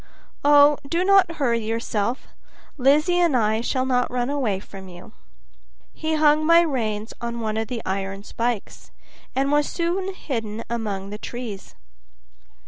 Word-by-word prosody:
"Oh, 290 0 +6
do 340 +3 +1
not 390 -3 +5
hurry 245 -7 0
yourself; 225 +2 -2 0.5
Lizzie 300 +6 +3
and 335 -7 +3
I 220 -1 +1
shall 255 +2 -1
not 250 -1 +1
run 250 +2 -1
away 240 -10 -1
from 195 -1 -11
you." 180 +4 -12 0.8
He 315 0 -2
hung 305 0 +4
my 335 +2 +6
rein 225 -10 -1 0.2
on 235 0 -4
one 215 -1 -2
of 220 0 -2
the 235 -1 -5
iron 195 +1 -3
spikes, 230 -1 -4 0.5
and 275 +2 +1
was 295 0 +2
soon 370 +3 -2
hidden 225 - -4
among 205 -4 -3
the 210 - -6
trees. 235 -6 -7
245 Hz, 145 wpm, -23 LUFS, 215-295 Hz, 0.8 s, Oh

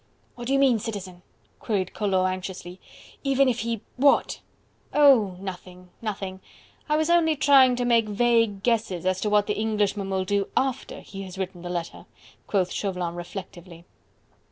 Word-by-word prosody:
"What 240 -1 -8
do 270 - 0
you - - +4
mean, 265 -4 +4
Citizen?" 190 -5 -6 0.4
queried 195 -4 -2
Collot 190 -3 +1
anxiously, 185 -1 -7 0.4
"even 275 -1 +3
if 245 -2 0
he... 230 -2 -3 0.2
what?..." 280 +2 +3 0.6
"Oh! 260 -10 +5
nothing, 180 -1 -9
nothing! 195 -3 -5 0.5
I 300 - +3
was 315 +2 +1
only 325 -2 +4
trying 270 -3 +5
to 245 0 -1
make 230 -2 +3
vague 230 -2 +2
guesses 220 -7 0
as 185 0 0
to 210 - 0
what 210 0 +3
the 210 - -1
Englishman 210 -2 0
will 190 -1 -1
do 200 0 0
AFTER 265 -2 -1
he 195 -1 -9
has 190 -1 -9
written 190 -2 -5
the 175 - -6
letter," 170 -1 -5 0.4
quoth 185 -3 0
Chauvelin 180 -4 -3
reflectively. 175 -1 -9
205 Hz, 160 wpm, -25 LUFS, 185-240 Hz, 0.6 s, Oh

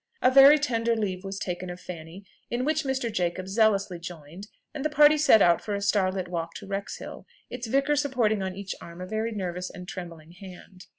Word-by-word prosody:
A 255 - +5
very 275 +3 +8
tender 235 -5 0
leave 190 -4 -3
was 195 0 -5
taken 180 -1 -4
of 175 0 -7
Fanny, 175 +2 -10 0.2
in 245 +2 -2
which 310 +1 +1
Mr. 265 -4 -2
Jacob 180 0 -2
zealously 200 -3 +1
joined, 170 +2 -10 0.3
and 295 -3 -5
the 305 - +1
party 300 0 +6
set 295 -8 +5
out 170 -1 +4
for 205 - -3
a - - -2
star 200 -2 +2
lit 185 -1 -4
walk 165 -1 -4
to - - -8
Wrexhill, 200 0 -6 0.2
its 245 -1 -5
vicar 275 +5 +2
supporting 250 -8 +1
on 190 -1 -4
each 195 0 -5
arm 170 +1 -11
a 180 - -5
very 220 +4 -2
nervous 180 -3 -4
and 180 0 -10
trembling 170 -4 -9
hand. 185 0 -13
195 Hz, 210 wpm, -26 LUFS, 180-235 Hz, 0.3 s, very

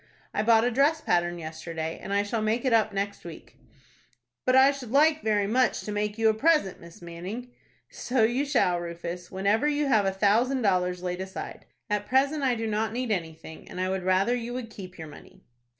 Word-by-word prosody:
I - - 0
bought 225 0 +4
a 245 - +1
dress 285 +6 +3
pattern 175 - 0
yesterday, 160 0 -6
and 195 - -7
I 200 0 +2
shall 215 +2 -2
make 220 +4 0
it 255 - +2
up 220 -1 +3
next 200 0 -3
week." 170 -2 -12 0.9
"But 255 - +3
I 265 +1 +7
should 275 -4 -8
like 305 +4 +4
very 210 -2 +1
much 250 +5 +1
to 210 - -6
make 210 +1 -2
you 225 0 +3
a 220 - +4
present, 280 - +1
Miss 170 +1 -14
Manning." 185 +9 -7 0.4
"So 250 -2 0
you 240 +5 +2
shall, 240 -11 +1
Rufus, 175 +1 -6
whenever 200 +8 +1
you 295 0 +1
have 220 -7 +3
a - - +2
thousand 225 +7 +2
dollars 180 -2 +1
laid 180 0 -3
aside. 190 0 -7 0.2
At 210 -1 -2
present 275 +3 +2
I 260 -3 +2
do 225 0 -3
not 215 0 -1
need 245 -1 -2
anything, 160 -4 -5
and - - -7
I 185 0 0
would 190 0 -2
rather 185 +6 +2
you 240 0 -5
would 240 -3 -6
keep 185 -2 -10
your 160 -1 -8
money." 150 - -15
210 Hz, 210 wpm, -27 LUFS, 180-245 Hz, 0.9 s, I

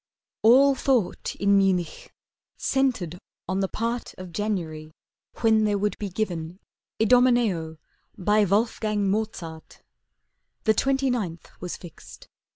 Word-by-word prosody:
All 265 +5 +6
thought 255 -7 0
in 200 0 +3
Munich 185 -4 0 0.5
centered 235 - 0 0.3
on 190 - -1
the 195 - +1
part 230 +4 -3
Of 185 -1 -9
January 165 -7 -3 0.5
when 220 -2 +4
there 205 -1 +1
would 205 +1 -1
be 205 - -3
given 175 -3 -4 0.4
'Idomeneo' 220 -9 +3 0.4
by 210 +2 +3
Wolfgang 210 0 +1
Mozart. 180 -7 -5 0.8
The 220 - +4
twenty 270 +3 +1
ninth 185 -9 -4
was 180 -1 -5
fixed. 175 -3 -13
205 Hz, 115 wpm, -25 LUFS, 180-230 Hz, 0.8 s, All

